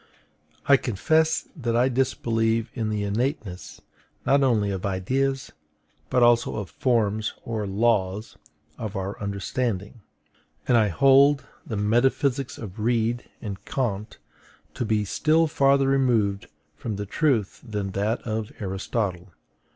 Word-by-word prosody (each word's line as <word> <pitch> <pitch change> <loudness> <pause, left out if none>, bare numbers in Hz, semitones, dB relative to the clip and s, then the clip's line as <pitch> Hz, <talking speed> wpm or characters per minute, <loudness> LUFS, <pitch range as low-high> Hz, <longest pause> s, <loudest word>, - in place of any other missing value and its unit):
I 140 - +6
confess 155 - +1
that 120 -7 -2
I 120 +2 +4
disbelieve 115 -3 0
in 110 -4 -2
the 105 -1 -1
innateness, 105 - -3 0.4
not 140 +1 +4
only 110 -7 +2
of 95 -2 -4
IDEAS, 130 +8 -1 0.6
but 125 - +3
also 120 0 +4
of 105 -5 -5
FORMS 110 -4 0
or 110 -3 -3
LAWS 105 0 0 0.4
of 110 -2 -5
our 95 +2 -4
understanding; 100 +2 -3 0.7
and 125 - +4
I 110 -2 +5
hold 135 - +5 0.2
the 110 - -3
metaphysics 130 +5 +1
of 105 -2 -8
Reid 115 +1 0
and 100 -2 -6
Kant 110 -6 -3 0.6
to 120 - -3
be 110 -1 +1
still 160 - +2
farther 140 -2 +3
removed 115 -7 +1 0.3
from 105 +7 -4
the 100 +1 -4
truth 115 -3 0
than 105 -5 -4
that 105 +5 -1
of 110 -2 -3
Aristotle. 95 -1 -3
115 Hz, 130 wpm, -25 LUFS, 100-130 Hz, 0.7 s, I